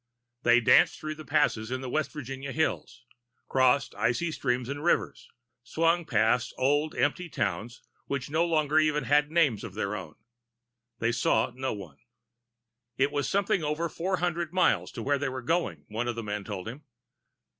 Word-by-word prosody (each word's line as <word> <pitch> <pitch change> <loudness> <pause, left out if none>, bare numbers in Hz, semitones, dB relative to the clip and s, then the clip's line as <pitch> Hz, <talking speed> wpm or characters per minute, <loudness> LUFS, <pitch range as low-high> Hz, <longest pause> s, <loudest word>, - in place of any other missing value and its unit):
They 120 -1 +5
danced 120 - +5
through 155 0 -4
the 155 0 -11
passes 110 -6 +1
in 130 +1 -3
the 130 - -5
West 155 0 0
Virginia 135 -1 -6
hills, 125 -4 -2 0.4
crossed 130 +1 +3
icy 145 +8 0
streams 125 -4 -1
and 145 +2 -5
rivers, 175 - 0 0.3
swung 165 +7 +1
past 115 0 +1
old 145 +4 +1
empty 180 -2 0
towns 115 - -3 0.2
which 135 -2 -3
no 160 +3 +1
longer 155 -2 +2
even 155 -1 +2
had 150 +1 +3
names 150 -9 +2
of 105 -4 -8
their 105 -1 -2
own. 90 -6 -8 0.8
They 115 +1 +1
saw 115 -1 +1
no 130 +1 -3
one. 90 -9 -10 1.0
It 140 +2 +2
was 145 -1 -1
something 195 -3 +1
over 150 +3 -1
four 185 +4 -2
hundred 170 -2 -1
miles 185 0 +2
to 115 - -5
where 140 +2 +1
they 145 - -1
were 130 -1 -6
going, 165 +6 -1
one 115 +3 -3
of 120 - -2
the 115 - -4
men 105 -1 -4
told 100 -1 -6
him. 130 +7 -8
135 Hz, 175 wpm, -28 LUFS, 120-155 Hz, 1.0 s, They